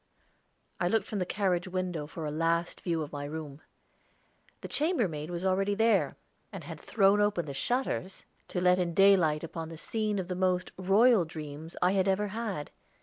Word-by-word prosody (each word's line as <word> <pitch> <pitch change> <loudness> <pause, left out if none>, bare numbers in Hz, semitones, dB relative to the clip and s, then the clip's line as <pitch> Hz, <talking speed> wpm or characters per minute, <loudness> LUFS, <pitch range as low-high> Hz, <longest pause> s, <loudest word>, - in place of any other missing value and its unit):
I 175 - +1
looked 210 +2 +1
from 210 - -4
the 180 - -1
carriage 185 -3 0
window 180 -5 -3
for 160 +1 -6
a 150 - -2
last 165 +2 0
view 165 -3 -1
of 150 - -8
my 145 -1 -5
room. 150 -1 -7 1.0
The - - -6
chambermaid 215 - 0
was 175 +1 -4
already 195 +2 +1
there, 225 +2 +2 0.4
and - - -7
had - - -8
thrown 200 -1 +3
open 205 -5 +1
the 140 - -6
shutters, 240 - -2 0.2
to 180 - -3
let 180 0 +4
in 170 -2 -1
daylight 180 -6 +5
upon 165 0 -5
the 165 - -8
scene 215 +4 -2
of 185 -2 -3
the 180 - -2
most 180 0 0
royal 200 +3 +4
dreams 155 0 -8
I 180 - +4
had 195 -1 +2
ever 200 +2 +1
had. 210 -8 -4
180 Hz, 185 wpm, -30 LUFS, 165-200 Hz, 1.0 s, daylight